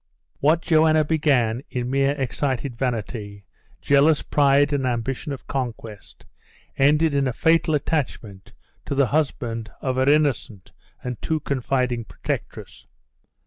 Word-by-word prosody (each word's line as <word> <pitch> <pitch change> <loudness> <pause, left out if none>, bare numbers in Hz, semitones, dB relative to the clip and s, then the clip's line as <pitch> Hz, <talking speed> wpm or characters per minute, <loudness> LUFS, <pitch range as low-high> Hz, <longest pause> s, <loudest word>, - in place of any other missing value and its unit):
What 155 +4 +2
Joanna 155 -1 +4
began 135 -7 +1
in 125 0 -3
mere 135 +1 +2
excited 135 -1 -2
vanity, 110 -5 -4 0.4
jealous 145 +2 +3
pride, 145 0 +3
and 135 -2 0
ambition 125 +4 -3
of 135 - -7
conquest, 115 -6 -6 0.5
ended 150 +3 +3
in 140 -1 +1
a 125 - -2
fatal 165 +3 +2
attachment 120 - -3 0.4
to 140 - -2
the 140 0 +4
husband 120 -6 -2
of 130 -1 -2
her 130 +1 +3
innocent 145 -9 0 0.3
and 125 -2 -5
too 160 -1 -1
confiding 125 -4 -1
protectress. - - -6
135 Hz, 125 wpm, -23 LUFS, 120-150 Hz, 0.5 s, Joanna